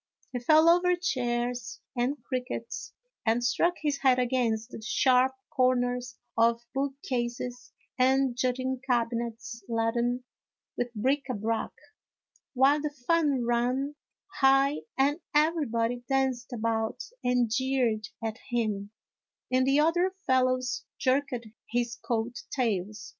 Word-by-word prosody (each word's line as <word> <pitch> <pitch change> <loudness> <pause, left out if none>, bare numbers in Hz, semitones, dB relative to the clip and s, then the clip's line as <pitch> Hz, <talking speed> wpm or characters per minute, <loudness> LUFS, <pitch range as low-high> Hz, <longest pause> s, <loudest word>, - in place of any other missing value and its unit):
He 250 - -3
fell 310 +6 +5
over 355 +1 +5
chairs 245 - -2 0.2
and 250 +4 0
crickets, 250 -2 -4 0.3
and 230 +1 +2
struck 340 +9 +2
his 290 -2 0
head 260 -2 +4
against 245 -2 0
the - - -8
sharp 255 +3 +3 0.2
corners 250 -1 +1 0.2
of 230 +1 +3
bookcases 250 -3 -3 0.3
and 265 0 +3
jutting 255 0 -1
cabinets 235 -1 -1
laden 235 +2 0 0.5
with 245 0 -2
bric 270 +6 0
a 250 - -1
brac, 225 +2 -1 0.9
while 275 +3 +4
the 300 - -1
fun 290 -2 +1
ran 250 +4 0 0.5
high 270 +1 +5 0.2
and 285 +4 +2 0.2
everybody 245 -7 +1
danced 265 -2 0
about 225 - -1 0.2
and 245 -2 +2
jeered 250 -4 +1 0.2
at 225 +1 -3
him, 215 -4 -1 0.6
and 255 +1 +3
the 275 +2 +4
other 350 +4 +2
fellows 255 -1 +1
jerked 265 0 +1 0.3
his 235 0 0
coat 235 +1 -2
tails. 210 -4 -2
250 Hz, 115 wpm, -28 LUFS, 235-270 Hz, 0.9 s, fell